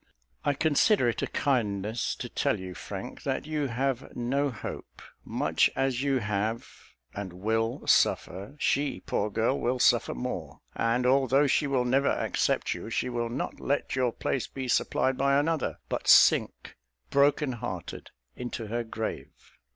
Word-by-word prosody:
I 145 - +1
consider 155 - +3
it 115 - -2
a - - -1
kindness 110 -5 -1
to - - -6
tell - - 0
you, 95 -1 -7
Frank, - - -7
that - - -2
you 150 -2 -1
have 130 +1 -2
no 135 +4 0
hope. 115 -7 -8 0.2
Much - - +2
as 135 -2 0
you 140 -1 +1
have 105 0 -2 0.5
and 100 -2 -5
will 110 +5 -1
suffer, 100 +9 +1
she, 145 0 0
poor 105 - -1
girl, 115 +6 0
will 125 +2 0
suffer 120 - +3
more; - - -5
and, 115 +2 0
although 135 +2 +4
she 145 +2 +2
will 130 -3 +1
never 135 +3 +2
accept - - 0
you, - - -7
she - - -1
will 120 -1 -2
not 125 +4 -4
let 140 0 -1
your 130 -2 +1
place 125 +1 -2
be 130 -1 -6
supplied 130 +1 +1
by 140 0 +3
another, 160 +2 0
but - - -4
sink, - - +5 0.4
broken 140 0 +3
hearted, 110 -8 -6 0.3
into 120 -2 -5
her 120 +3 -2
grave. 110 -1 -5
125 Hz, 155 wpm, -28 LUFS, 115-140 Hz, 0.5 s, sink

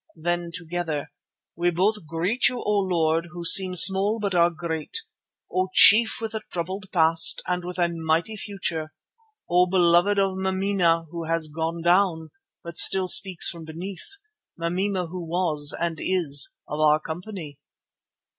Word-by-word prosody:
Then 175 +1 -3
together, 165 -3 -5 0.4
"We 175 +1 0
both 185 +1 -1
greet 175 - 0
you, 250 -1 -6
O 210 -1 0
Lord, 165 -3 0
who 175 -1 -8
seem 185 +1 +6
small 195 +4 +4
but 200 -2 -3
are 170 -1 +3
great, 165 - -5 0.6
O 185 0 0
Chief 220 +2 +6
with 225 -1 -5
a 220 - -4
troubled 185 +3 -5
past 165 -1 +3
and 180 0 -2
with 180 +1 -7
a 175 -1 +2
mighty 165 +5 -2
future, 170 -7 -5 0.5
O 180 +1 +3
Beloved 175 +2 +2
of 195 -1 0
Mameena 190 -3 0
who 170 -1 -6
has 165 -1 -1
'gone 165 +1 -4
down' 175 -2 +1 0.3
but 170 0 -9
still 190 -1 +4
speaks 185 -1 +4
from 170 -1 -4
beneath, 180 - -7 0.4
Mameena 180 +3 -2
who 180 +1 -7
was 160 -4 0
and 165 -2 -3
is 165 -7 +2 0.2
of 150 - -6
our 155 0 +3
company." 160 -2 -8
175 Hz, 150 wpm, -23 LUFS, 165-190 Hz, 0.6 s, seem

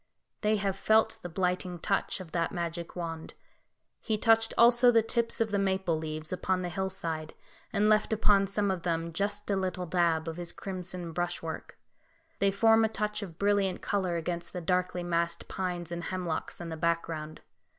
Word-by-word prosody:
They 215 0 +3
have 195 -2 -1
felt 220 +3 +3
the 175 - -6
blighting 180 0 -1
touch 195 +3 -1
of 180 -4 -9
that 170 -1 0
magic 170 0 -4
wand. 165 -2 -5 0.6
He 220 -2 -1
touched 225 +1 +4
also 240 +1 +7
the 230 -2 +5
tips 230 +1 0
of 225 -2 +1
the 200 - +1
maple 190 -3 +1
leaves 155 +1 -4
upon 185 0 0
the 175 - -2
hillside, 170 -4 -3 0.4
and 210 0 +2
left 215 +1 +3
upon 205 -2 +4
some 200 0 0
of 185 -2 -2
them 165 -1 -1
just 205 +3 -2
a - - +3
little 185 -1 -2
dab 170 -2 +1
of 165 0 -4
his 175 -1 -4
crimson 180 -2 -5
brushwork; 175 -1 -4 0.6
they 200 - +4
form 225 +3 +5
a 220 - +3
touch 210 -1 -2
of 175 -5 -8
brilliant 200 -2 +1
colour 185 -4 0
against 170 +1 -4
the 180 - -3
darkly 180 +1 0
massed 170 -1 -1
pines 175 -2 -3
and 170 -1 -4
hemlocks 180 -4 -3
in 170 -1 -6
the 160 - -5
background. 165 -2 -2
180 Hz, 180 wpm, -30 LUFS, 170-200 Hz, 0.6 s, also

